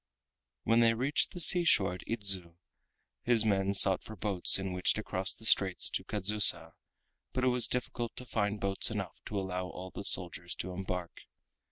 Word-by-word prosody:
When 115 +1 +2
they 115 -1 +3
reached 135 +6 -1
the 180 - -9
seashore 170 - +3
at 90 - -10
Idzu 95 -6 -2 0.7
his 115 -2 +2
men 100 -1 0
sought 95 -1 +5
for 110 - -11
boats 100 -2 +2
in 95 -1 -5
which 90 0 0
to 110 - -6
cross 95 -2 -2
the 110 - -11
straits 95 -4 +3
to - - -4
Kadzusa, 100 -5 +3 0.6
but 130 0 -3
it 130 - +2
was 125 -2 +1
difficult 120 -1 -5
to 125 - -9
find 105 -3 -3
boats 100 -1 -1
enough - - -7
to 105 - -4
allow 90 -1 -5
all 90 +1 -10
the - - -8
soldiers 90 -2 +1
to 95 - -6
embark. 90 -1 -6
100 Hz, 180 wpm, -30 LUFS, 90-115 Hz, 0.7 s, sought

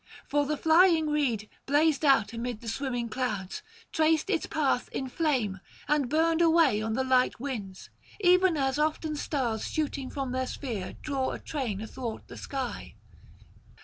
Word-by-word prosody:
For 290 0 +1
the 300 0 -1
flying 320 -1 +4
reed 245 -8 0 0.2
blazed 295 +2 +3
out 235 -7 +4
amid 235 -1 -4
the 235 - -9
swimming 245 0 -2
clouds, 215 -6 -3 0.3
traced 315 +3 +2
its 340 - 0
path 285 -5 0
in 265 - -3
flame, 250 - 0 0.3
and 295 -4 +1
burned 325 +2 +2
away 325 -10 +4
on 220 0 -2
the 265 - 0
light 255 -2 +2
winds; 215 -8 -6 0.3
even 365 -3 +4
as 270 0 0
often 310 0 0
stars 255 -7 -2
shooting 285 -3 -2
from 275 -3 -4
their 260 0 -1
sphere 225 -11 -5
draw 270 -3 -1
a - - -6
train 240 -10 -3
athwart 225 0 -6
the - - -9
sky. 265 -3 -5
270 Hz, 155 wpm, -28 LUFS, 235-310 Hz, 0.3 s, flying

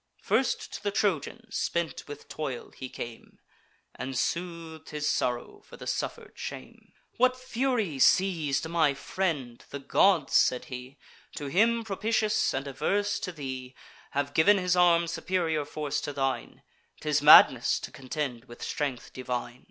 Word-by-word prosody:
First 265 - 0
to - - -6
the 205 - 0
Trojan, 195 -7 -1
spent 170 -1 -2
with 145 0 -9
toil, 140 -6 -5
he 130 - -8
came, 120 -2 -9 0.6
And 130 0 -5
sooth'd 165 0 -3
his 150 -1 -3
sorrow 125 -4 -1
for - - -14
the - - -9
suffer'd - - -3
shame. 65 - -8 0.2
"What 255 +1 +3
fury 245 - -1
seiz'd 160 -3 +3
my 160 -4 +2
friend? 140 -5 -3
The 140 - -5
gods," 150 +3 +3
said 125 - +3
he, 125 +2 -8 0.4
"To 145 - -5
him 230 +6 +3
propitious, 215 +1 +1
and 135 +1 -3
averse 205 +9 0
to 185 - -4
thee, 130 -5 -7 0.3
Have 145 0 -2
giv'n 200 +6 +5
his 180 -1 +1
arm 170 -1 +5
superior 165 -3 -1
force 150 -1 -3
to 145 - -4
thine. 135 -1 -3 0.4
'Tis - - +1
madness - - +8
to - - -7
contend 130 -3 -4
with 120 -2 -11
strength 140 -6 -3
divine." 125 -1 -4
150 Hz, 145 wpm, -28 LUFS, 135-185 Hz, 0.6 s, madness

